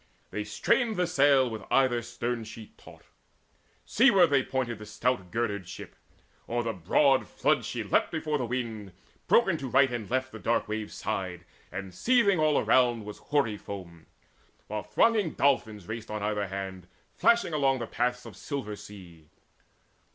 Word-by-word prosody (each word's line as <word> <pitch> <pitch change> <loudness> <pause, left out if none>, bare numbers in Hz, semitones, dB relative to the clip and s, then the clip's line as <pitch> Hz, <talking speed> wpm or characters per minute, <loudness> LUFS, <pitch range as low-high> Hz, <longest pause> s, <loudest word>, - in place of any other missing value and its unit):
They 105 - -3
strained 220 - +1
the 180 -1 +1
sail 140 -5 +4
with 110 -3 -5
either 130 -3 +3
stern 120 0 -4
sheet 110 0 -11
taut; - - -16 0.8
Seaward 195 - +5
they 140 -1 +4
pointed 125 -4 -3
the 105 - -9
stout 110 -3 -1
girdered 105 -4 -2
ship; - - -9 0.5
O'er 120 +1 0
the 115 -1 -2
broad 130 - +2
flood - - +1
she - - -3
leapt - - +1
before 155 -2 -2
the 125 - -2
wind; 110 -6 -4 0.3
Broken 190 -8 +4
to 135 - -5
right 135 +1 +4
and 120 -4 -4
left 130 +1 -1
the 110 - -9
dark 115 +2 0
wave 110 0 -4
sighed, 95 -5 -4 0.3
And 95 0 -6
seething 225 - +3
all 155 -2 +3
around 120 -4 +3
was 105 - -8
hoary 140 -8 0
foam, 90 -6 -9 0.6
While 105 0 -4
thronging 200 - +2
dolphins 110 -9 0
raced 110 0 -6
on 105 -1 -4
either 105 -1 -1
hand 95 -2 -6 0.3
Flashing 235 -8 +3
along 135 -3 +2
the 120 - -4
paths 125 +1 -2
of 115 -5 -10
silver 110 -4 -5
sea. 85 -7 -13
120 Hz, 165 wpm, -28 LUFS, 105-140 Hz, 0.8 s, Seaward